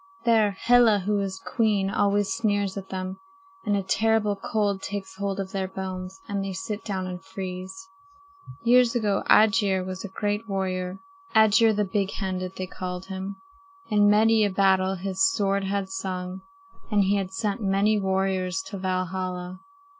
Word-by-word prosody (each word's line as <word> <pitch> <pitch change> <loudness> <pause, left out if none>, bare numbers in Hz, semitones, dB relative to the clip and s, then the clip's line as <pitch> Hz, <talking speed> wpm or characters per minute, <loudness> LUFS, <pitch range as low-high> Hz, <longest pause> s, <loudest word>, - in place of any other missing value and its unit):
There 215 -4 +3
Hela, 240 -3 +5
who 205 0 +1
is 190 -1 -3
queen, 210 -4 +1
always 205 +1 +1
sneers 205 -4 0
at 195 -1 -7
them, 185 0 -5 0.5
and 205 -1 +2
a 195 - -1
terrible 220 +1 +2
cold 200 -1 -1
takes 195 -1 -5
hold 200 0 -2
of 190 -1 -4
their 190 -1 -2
bones, 190 0 -6
and 200 -1 -2
they 195 -1 -4
sit 200 +3 -5
down 190 -3 -3
and 180 0 -6
freeze. 190 - -7 0.8
"Years 245 0 +5
ago 210 -4 +1
Aegir 210 -3 +4
was 185 0 -6
a - - -4
great 205 +3 -3
warrior. 185 -1 -2 0.4
Aegir 220 +1 +6
the 210 0 +1
Big 195 0 -1
handed, 185 -2 -3
they 185 - -4
called 185 0 -6
him. 190 +1 -5 0.6
In 205 -1 +5
many 220 +1 +5
a 205 - +2
battle 190 0 +2
his 190 +1 -1
sword 195 -1 0
had 195 0 -1
sung, 185 -1 -4 0.5
and 210 -2 +3
he 200 +1 +2
had 190 -1 -3
sent 205 +1 -2
many 200 +2 +2
warriors 190 -1 0
to 200 - -5
Valhalla. 185 0 -3
195 Hz, 160 wpm, -25 LUFS, 190-210 Hz, 0.8 s, Aegir